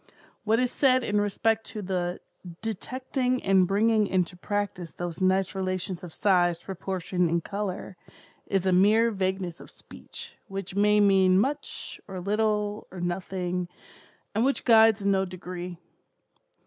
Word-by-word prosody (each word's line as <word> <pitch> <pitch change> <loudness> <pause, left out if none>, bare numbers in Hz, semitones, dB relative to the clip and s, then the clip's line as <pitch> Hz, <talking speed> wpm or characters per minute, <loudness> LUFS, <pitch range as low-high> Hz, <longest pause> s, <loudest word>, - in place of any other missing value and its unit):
What 220 +2 +3
is 250 -1 +1
said 255 -2 +3
in 210 -2 +1
respect 220 +2 +1
to 210 -2 -6
the 180 -2 -2 0.4
'detecting 255 +4 -2
and 190 -2 +4
bringing 215 +2 +3
into 180 -2 0
practice 185 -3 -3
those 175 0 -5
nice 190 0 +2
relations 185 -1 -3
of 175 - -8
size, 175 -2 +2
proportion 180 -1 -2
and 170 0 0
color,' 195 -2 -4 0.5
is 195 -2 0
a 185 - +3
mere 215 +5 +5
vagueness 190 -3 -2
of - - -12
speech, - - -10
which 195 -1 -6
may 210 +1 +4
mean 190 -2 +5
much, 280 +7 -3
or 190 -2 -6
little, 210 +1 -1
or 185 - -9
nothing, 180 0 -2 0.7
and 220 +3 +1
which 275 +2 0
guides 220 -3 +6
in 200 - +3
no 190 -1 +2
degree. 180 -1 -7
195 Hz, 145 wpm, -27 LUFS, 180-210 Hz, 0.7 s, guides